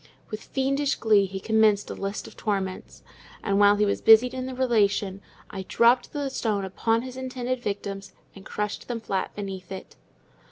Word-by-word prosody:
With 215 0 -5
fiendish 275 +1 0
glee 210 -3 +3
he 190 +1 -6
commenced 215 -1 +2
a - - -3
list 195 +1 -4
of - - -12
torments; 195 -3 -3 0.4
and 200 -1 +1
while 205 0 +6
he 210 0 +2
was 200 - -1
busied 225 +3 +6
in 255 0 -4
the 260 - -6
relation, 210 -6 +1 0.3
I 195 - -5
dropped 235 +6 +3
the 285 -2 -2
stone 210 -6 -1
upon 225 +4 0
his 255 0 -8
intended 255 -1 -3
victims 200 -2 -4 0.2
and 195 - -12
crushed 210 +1 -4
them 240 -2 -3
flat 195 -4 -3
beneath 195 -3 -6
it. 190 - -8
210 Hz, 175 wpm, -26 LUFS, 195-250 Hz, 0.4 s, while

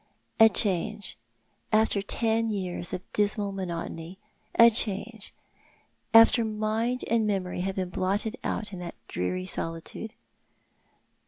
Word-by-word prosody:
" - - -41
A 225 0 +9
change 205 +1 +2 0.3
— - - -43 0.2
after 215 -2 +3
ten 225 +2 0
years 185 -4 -2
of 180 - -4
dismal 205 -1 0
monotony! 175 -2 -6 0.4
A 230 0 +8
change 215 0 0 0.4
— - - -40
after 235 - 0
mind 220 +3 -1
and 225 -2 +1
memory 185 -3 -2
had 190 +1 -2
been 185 -2 -2
blotted 200 +6 -1
out 210 -2 -3
in 185 - -6
that 175 -6 -7
dreary 90 0 -3
solitude 165 - -4
205 Hz, 135 wpm, -27 LUFS, 185-220 Hz, 0.4 s, A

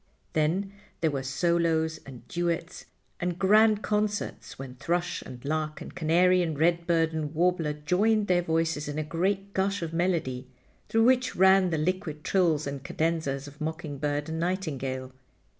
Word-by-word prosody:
Then 180 +6 0 0.3
there 160 -2 +2
were 135 -2 -2
solos, 160 +3 +1
and 130 -3 -11
duets, 170 0 -2 0.3
and 175 -1 -2
grand 215 +3 +4
concerts, 210 -1 -2
when 135 -1 -7
thrush 175 +6 -2
and 125 0 -10
lark 155 +1 -2
and - - -9
canary 175 +2 +3
and 160 -4 -2
redbird 170 0 +2
and 155 -1 -3
warbler 170 -2 +1
joined 200 +9 +2
their 180 -2 +3
voices 165 -3 0
in 145 0 -4
a 155 - 0
great 190 +5 -1
gush 195 -1 0
of 165 0 -4
melody 165 -8 -1 0.4
through 225 0 +3
which 250 0 +3
ran 190 0 +5
the 160 - 0
liquid 155 -2 -2
trills 165 -6 +2
and 140 -1 -5
cadenzas 155 -3 -1
of 145 +2 -13
mocking 155 -2 -4
bird 145 +1 -1
and 160 0 -3
nightingale. 135 -8 -3
165 Hz, 160 wpm, -28 LUFS, 150-180 Hz, 0.4 s, ran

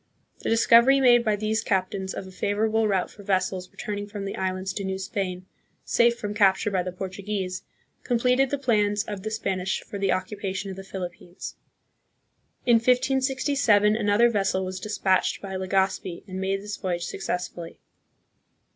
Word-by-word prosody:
The - - -3
discovery 235 +4 +6
made 240 -2 +6
by 215 -2 +2
these 215 +1 0
captains 190 -1 -1
of - - -5
a 190 - -11
favorable 215 +3 +1
route 190 -3 0
for 205 - -13
vessels 185 -2 -1
returning 205 -2 -5
from 205 -1 -6
the 195 - -4
islands 185 0 -2
to 200 - -4
New 190 0 -2
Spain 190 -1 -3 0.4
safe 235 0 +3
from 210 -2 -4
capture 205 0 +3
by 190 -2 +1
the 180 +1 -4
Portuguese, 190 0 -4 0.4
completed 250 +2 +2
the 285 - -1
plans 210 -6 +1
of 205 -3 -6
the 215 - -3
Spanish 190 -4 -2
for 200 - -7
the 195 -1 +1
occupation 195 0 -3
of - - -7
the 195 - -8
Philippines. 180 -1 -7 1.1
In 240 -2 +6
1567 255 -3 +3
another 220 +2 +3
vessel 195 -3 0
was 185 0 -5
dispatched 190 -2 +1
by 195 -1 -7
Legazpi 190 -1 -1
and 190 0 -5
made 195 +1 -1
this 205 0 -5
voyage 175 -3 -2
successfully. 180 -3 -5
200 Hz, 160 wpm, -25 LUFS, 190-220 Hz, 1.1 s, discovery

